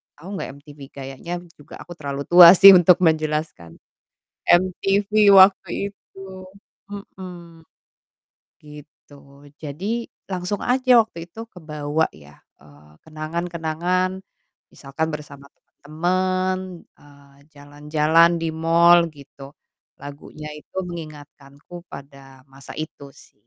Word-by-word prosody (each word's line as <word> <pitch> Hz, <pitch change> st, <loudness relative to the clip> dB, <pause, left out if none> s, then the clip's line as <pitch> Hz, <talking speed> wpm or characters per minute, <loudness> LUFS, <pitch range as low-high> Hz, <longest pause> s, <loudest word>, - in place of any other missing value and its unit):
tau 165 Hz, +5 st, -15 dB
nggak -, -, -5 dB
MTV? 145 Hz, -1 st, -16 dB
Kayaknya 135 Hz, +5 st, -9 dB
m -, -, -17 dB
juga 145 Hz, 0 st, -14 dB
aku -, -, -14 dB
terlalu 140 Hz, -1 st, -5 dB
tua 175 Hz, 0 st, +10 dB
sih 195 Hz, +1 st, +9 dB
untuk 180 Hz, 0 st, +5 dB
menjelaskan. 155 Hz, -, -1 dB, 0.8 s
MTV 195 Hz, +3 st, +1 dB, 0.2 s
waktu 190 Hz, 0 st, +5 dB, 0.3 s
itu, -, -, -20 dB, 0.7 s
mhm, 175 Hz, -4 st, -11 dB, 1.0 s
gitu. 145 Hz, -1 st, -17 dB
Jadi 195 Hz, +11 st, -5 dB, 0.3 s
langsung 185 Hz, +2 st, -4 dB
aja 250 Hz, -1 st, +3 dB
waktu 170 Hz, -6 st, -11 dB
itu 225 Hz, -, -12 dB
kebawa 155 Hz, -2 st, -3 dB
ya, 75 Hz, -1 st, -17 dB, 0.2 s
eee, 75 Hz, +1 st, -20 dB, 0.2 s
kenangan-kenangan 170 Hz, +3 st, -3 dB, 0.5 s
misalkan 145 Hz, +3 st, -5 dB
bersama 140 Hz, -2 st, -11 dB, 0.4 s
temen. 185 Hz, +2 st, -2 dB
Eee, 140 Hz, -1 st, -21 dB, 0.2 s
jalan-jalan 150 Hz, +3 st, +1 dB
di 165 Hz, -, -2 dB
mall 170 Hz, +1 st, +4 dB
gitu 140 Hz, 0 st, -14 dB, 0.5 s
lagunya 150 Hz, +1 st, -10 dB
itu 150 Hz, -, -16 dB
mengingatkanku 155 Hz, 0 st, -12 dB
pada 135 Hz, -1 st, -14 dB
masa 135 Hz, 0 st, -14 dB
itu 150 Hz, -2 st, -8 dB
sih -, -, -19 dB
160 Hz, 105 wpm, -21 LUFS, 145-180 Hz, 1.0 s, tua